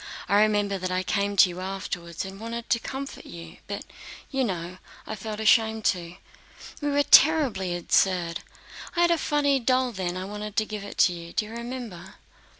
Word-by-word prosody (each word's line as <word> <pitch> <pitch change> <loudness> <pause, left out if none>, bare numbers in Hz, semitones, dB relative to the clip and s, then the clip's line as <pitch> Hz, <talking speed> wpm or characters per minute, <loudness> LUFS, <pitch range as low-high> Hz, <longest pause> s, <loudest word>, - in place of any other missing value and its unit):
"I 200 +2 +4
remember 205 -2 +2
that 185 0 -3
I 185 0 0
came 200 +1 0
to 190 - +8
you 175 +1 -7
afterwards 185 -3 -5
and 190 +1 -9
wanted 230 +1 -6
to 235 - +4
comfort 275 +3 -6
you, 85 -1 -10
but - - -4
do 270 - -12
you - - +4
know, 180 -4 -4 0.3
I - - -5
felt 215 +1 -6
ashamed 220 0 +3
to. 175 -1 -9 0.7
We 290 - 0
were 285 0 +3
terribly 265 - +5
absurd. 175 -1 +1 0.6
I 345 - +2
had 345 0 +4
a 335 - +2
funny 285 -2 +2
doll 255 +1 +2
then 185 -4 -3
and 185 +1 -5
wanted 210 0 -6
to 215 - +2
give 210 -2 -6
it 200 - -9
to 180 - 0
you. 170 0 -9
Do 215 - 0
you 215 - -10
remember?" 235 -5 -7
205 Hz, 195 wpm, -26 LUFS, 185-235 Hz, 0.7 s, to